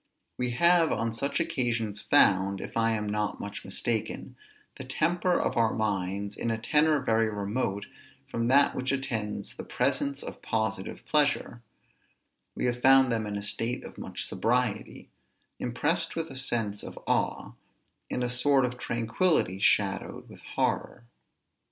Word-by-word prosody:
We 125 Hz, 0 st, -1 dB
have 170 Hz, 0 st, +5 dB
on 115 Hz, 0 st, -1 dB
such 140 Hz, +8 st, -1 dB
occasions 120 Hz, -10 st, -1 dB
found, 95 Hz, 0 st, +3 dB
if -, -, -7 dB
I 115 Hz, 0 st, +2 dB
am 105 Hz, -1 st, -1 dB
not 105 Hz, 0 st, -1 dB
much 100 Hz, 0 st, -6 dB
mistaken, 110 Hz, +3 st, -3 dB, 0.4 s
the -, -, -6 dB
temper 175 Hz, +1 st, +1 dB
of -, -, -1 dB
our 115 Hz, -1 st, +3 dB
minds 100 Hz, -1 st, -2 dB
in 115 Hz, -, -2 dB
a 115 Hz, -, 0 dB
tenor 150 Hz, +6 st, +3 dB
very 115 Hz, -4 st, +2 dB
remote 100 Hz, 0 st, -2 dB, 0.4 s
from 115 Hz, 0 st, -2 dB
that 140 Hz, +3 st, +5 dB
which 130 Hz, 0 st, -2 dB
attends 110 Hz, -7 st, -3 dB
the -, -, -7 dB
presence 140 Hz, 0 st, 0 dB
of -, -, -8 dB
positive 110 Hz, -3 st, -2 dB
pleasure; 145 Hz, -5 st, +1 dB, 0.9 s
we -, -, -2 dB
have 120 Hz, 0 st, -1 dB
found 135 Hz, -1 st, +6 dB
them 110 Hz, -2 st, -1 dB
in 105 Hz, -, -4 dB
a 100 Hz, -, -4 dB
state 115 Hz, +4 st, -2 dB
of -, -, -10 dB
much -, -, -5 dB
sobriety, 120 Hz, -2 st, -1 dB, 0.5 s
impressed 150 Hz, +7 st, 0 dB
with 165 Hz, 0 st, -3 dB
a -, -, -9 dB
sense 115 Hz, -6 st, -2 dB
of -, -, -9 dB
awe, -, -, 0 dB, 0.6 s
in 125 Hz, -, -1 dB
a -, -, +1 dB
sort 130 Hz, +2 st, +3 dB
of 125 Hz, 0 st, -5 dB
tranquillity 115 Hz, -, +1 dB
shadowed 100 Hz, -1 st, +1 dB
with -, -, -13 dB, 0.2 s
horror. 120 Hz, -, -1 dB
115 Hz, 150 wpm, -28 LUFS, 105-135 Hz, 0.9 s, found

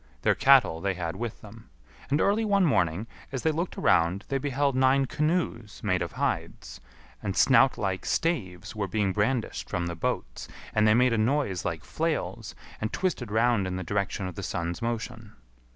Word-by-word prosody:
Their -, -, +4 dB
cattle 130 Hz, -12 st, +4 dB
they 100 Hz, -1 st, -1 dB
had 85 Hz, -1 st, -4 dB
with 115 Hz, +2 st, -5 dB
them. 110 Hz, +1 st, -13 dB, 0.4 s
And 145 Hz, +2 st, +2 dB
early 205 Hz, +5 st, +2 dB
one 200 Hz, -3 st, +3 dB
morning, 95 Hz, -, +1 dB, 0.3 s
as 130 Hz, -2 st, -4 dB
they 160 Hz, -, +3 dB
looked 170 Hz, +4 st, -3 dB
around, 85 Hz, +5 st, +2 dB
they 135 Hz, -, 0 dB
beheld 140 Hz, 0 st, 0 dB
nine 130 Hz, +1 st, +4 dB
canoes 150 Hz, -, -1 dB
made 90 Hz, -4 st, +1 dB
of 85 Hz, -4 st, -3 dB
hides, -, -, -3 dB, 0.4 s
and 95 Hz, -, -3 dB
snout 135 Hz, 0 st, +5 dB
like 95 Hz, -2 st, -2 dB
staves 100 Hz, -, -1 dB
were 100 Hz, -2 st, -2 dB
being 100 Hz, 0 st, 0 dB
brandished 110 Hz, +4 st, -1 dB
from 90 Hz, -4 st, -2 dB
the 85 Hz, -, -3 dB
boats, -, -, -3 dB, 0.3 s
and 110 Hz, 0 st, +3 dB
they 110 Hz, -, +5 dB
made 125 Hz, 0 st, +4 dB
a 115 Hz, -, +1 dB
noise 115 Hz, -5 st, 0 dB
like -, -, -3 dB
flails, -, -, -3 dB, 0.3 s
and 110 Hz, -, -2 dB
twisted 175 Hz, -, -2 dB
round 110 Hz, -2 st, +2 dB
in 90 Hz, -, -3 dB
the 95 Hz, -, -3 dB
direction 100 Hz, +1 st, -2 dB
of 90 Hz, -, -6 dB
the -, -, -7 dB
sun's 85 Hz, +4 st, -3 dB
motion. 115 Hz, -1 st, -4 dB
110 Hz, 185 wpm, -27 LUFS, 95-135 Hz, 0.4 s, snout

